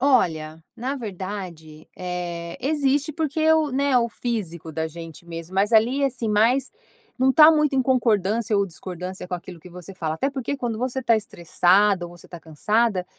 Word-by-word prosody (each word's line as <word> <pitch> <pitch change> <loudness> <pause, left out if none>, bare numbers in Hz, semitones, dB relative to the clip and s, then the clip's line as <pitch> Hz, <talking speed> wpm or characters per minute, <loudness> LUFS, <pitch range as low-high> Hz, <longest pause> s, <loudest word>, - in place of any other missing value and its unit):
olha, 160 - +1
na 260 +4 -3
verdade, 185 - -7
eh, 175 -2 -5
existe 290 +2 +1
porque 315 0 0
o 310 -2 +2
né, 275 0 +1
o 235 0 +1
físico 180 -10 -4
da 160 +1 -2
gente 165 +1 -10
mesmo, 165 +2 -8
mas 205 +4 +1
ali 245 +6 +4
assim 245 -4 -1
mais, 235 +6 +2 0.5
não 260 +1 +4
está 305 +3 +8
muito 300 -3 +2
em 265 - +3
concordância 225 -4 +1
ou 200 - +3
discordância 180 0 -7
com 180 - -4
aquilo 175 0 -9
que 180 - -14
você 180 +2 -10
fala 160 -4 -3
até 270 - -1
porque 275 +1 -3
quando 235 -4 -3
você 255 +1 -2
está 230 -3 +3
estressada 185 -1 +2
ou 175 0 -13
você - - -16
tá 175 - -9
cansada, 200 +5 0
210 Hz, 175 wpm, -23 LUFS, 175-260 Hz, 0.5 s, está